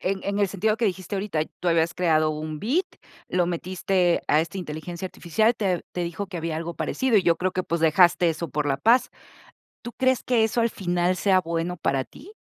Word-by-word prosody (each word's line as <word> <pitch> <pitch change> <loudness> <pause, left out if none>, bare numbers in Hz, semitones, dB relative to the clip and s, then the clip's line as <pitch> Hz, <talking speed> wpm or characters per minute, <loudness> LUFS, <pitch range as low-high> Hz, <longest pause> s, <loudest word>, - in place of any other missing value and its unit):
en 190 +1 -1
en 200 0 -1
el 200 -2 +2
sentido 215 +3 0
que 230 - -1
dijiste 185 -1 -2
ahorita, 190 -5 -2 0.2
tú 180 - 0
habías 165 0 +2
creado 160 -3 +2
un 155 0 -5
beat, 290 - +1 0.4
lo 180 -1 +1
metiste 180 0 0
a 150 - +4
esta 165 +4 -4
inteligencia 170 +2 -6
artificial, 220 +7 +1
te 185 -6 -1
te 180 - -2
dijo 170 +4 -4
que 185 -2 -7
había 165 -1 -3
algo 170 +1 -5
parecido, 260 -4 0
y 195 - +4
yo 170 -2 +3
creo 185 +1 -1
que, 185 - -1
pues, 170 -1 -2
dejaste 175 +2 +4
eso 165 0 -3
por 150 +1 -2
la 135 - +1
paz. 230 - +3 0.7
¿Tú 240 - -7
crees 260 -1 +1
que 235 -3 +2
eso 225 +2 0
al 230 - +2
final 175 -1 0
sea 190 0 +3
bueno 170 0 -3
para 135 -4 0
ti? 345 - -15
180 Hz, 215 wpm, -24 LUFS, 165-200 Hz, 0.7 s, a